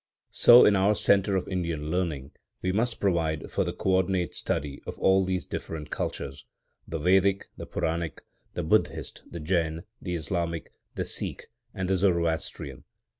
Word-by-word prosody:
So, 120 +1 +8
in 105 - +5
our 100 +2 +3
centre 100 0 +3
of 95 - -1
Indian 85 -5 -2
learning, 80 -6 -2 0.3
we 95 - +1
must 115 +4 0
provide 80 -6 0
for - - +1
the - - -2
co 95 - -1
ordinate 95 -1 0
study 70 -1 -2
of - - -6
all 95 0 +4
these 95 -1 -1
different 75 -2 -6
cultures,—the 70 +3 -6
Vedic, 95 +4 +3
the - - -8
Puranic, 80 0 -2 0.3
the - - -2
Buddhist, - - 0
the 85 - -7
Jain, 80 0 0 0.2
the 90 -2 -3
Islamic, 85 0 -3 0.2
the - - -2
Sikh - - -1 0.3
and 95 -2 -2
the 95 - +2
Zoroastrian. 85 -7 -1
90 Hz, 155 wpm, -27 LUFS, 80-95 Hz, 0.3 s, So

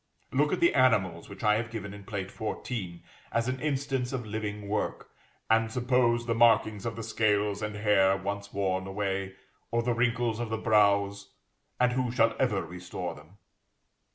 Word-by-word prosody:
Look 145 +3 +2
at 185 - -1
the 170 - +5
animals 105 -10 +2
which 100 +1 -10
I 105 -1 +4
have 115 0 -3
given 100 -3 -6
in 100 -1 -11
Plate 95 -2 -4
14, 105 -5 -5 0.3
as 115 +1 0
an 130 0 -2
instance 135 -3 -1
of 130 -3 -3
living 105 -1 -4
work, 105 +1 -3 0.4
and 110 0 +3
suppose 120 -1 +2
the 115 - 0
markings 115 -2 +3
of 115 - -4
the 115 - -6
scales 105 -2 +1
and 105 0 -3
hair 100 -2 +3
once 100 +1 -4
worn 95 -1 -1
away, 95 -1 -2 0.3
or 115 0 0
the 120 0 +1
wrinkles 120 -1 +1
of 120 -2 -3
the 110 - -1
brows, 100 -2 +2 0.5
and 125 0 +3
who 125 -1 0
shall 115 -2 +3
ever 105 -8 +1
restore 90 +1 -6
them? 75 +7 -16
110 Hz, 175 wpm, -29 LUFS, 100-120 Hz, 0.5 s, the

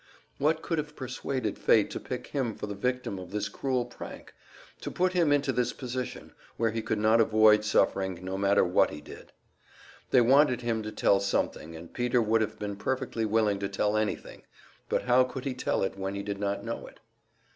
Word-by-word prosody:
What 155 +3 +1
could 165 -2 -1
have 150 0 -5
persuaded 130 -3 -3
fate - - +4
to - - -4
pick - - -5
him 125 -6 -2
for - - -5
the 100 - -5
victim 125 -1 -2
of 90 -1 -9
this 105 +1 -2
cruel 125 +3 -1
prank; 120 - -10 0.5
to - - -5
put 185 0 0
him 170 -5 +3
into 145 -1 +2
this 125 -1 0
position, 125 -1 -5 0.2
where 115 -1 +1
he 115 +1 -2
could 110 - -1
not 110 +2 +4
avoid 110 -1 +5
suffering, 95 -3 +1
no 95 +1 -3
matter 100 +1 +3
what 90 - +3
he 75 - -7
did? 75 - -12 0.8
They 125 - +5
wanted 130 +1 +4
him 115 -2 -1
to 110 0 -5
tell 100 -2 +3
something, 90 -4 -2
and 80 +1 -11
Peter 125 0 +1
would 110 0 +2
have 110 - -2
been 100 -1 -4
perfectly 125 0 -2
willing 105 -2 +2
to 100 0 -2
tell 105 +1 0
anything 110 -1 -2 0.5
but - - 0
how 125 +1 +5
could 130 +1 -6
he 135 - -1
tell 125 - -1
it 95 0 -3
when 95 +1 -3
he 100 - -4
did 100 -1 -4
not 100 0 -2
know 115 - -5
it? - - -16
110 Hz, 205 wpm, -28 LUFS, 100-125 Hz, 0.8 s, avoid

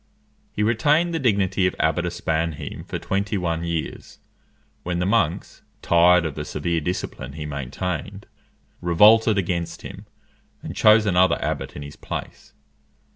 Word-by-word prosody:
He 105 - -2
retained 150 +10 +2
the 165 - -1
dignity 100 - +2
of - - -3
Abbot 85 +2 +1
of - - -3
Spannheim 80 -3 -3
for - - -4
twenty 100 +2 -2
one 85 -2 -2
years, 85 -2 -5 0.6
when 90 0 -3
the 90 - 0
monks, 95 -5 0 0.2
tired 85 0 +5
of 80 - -3
the 75 - -5
severe 80 +2 -2
discipline 80 -4 -4
he 75 0 -6
maintained, 85 +8 -5 0.6
revolted 105 +5 +5
against 85 -2 -2
him, - - -10 0.6
and - - -7
chose 110 0 +5
another 95 -2 +3
abbot - - -3
in 70 - -7
his 70 - -10
place. - - -8
90 Hz, 145 wpm, -23 LUFS, 80-100 Hz, 0.6 s, tired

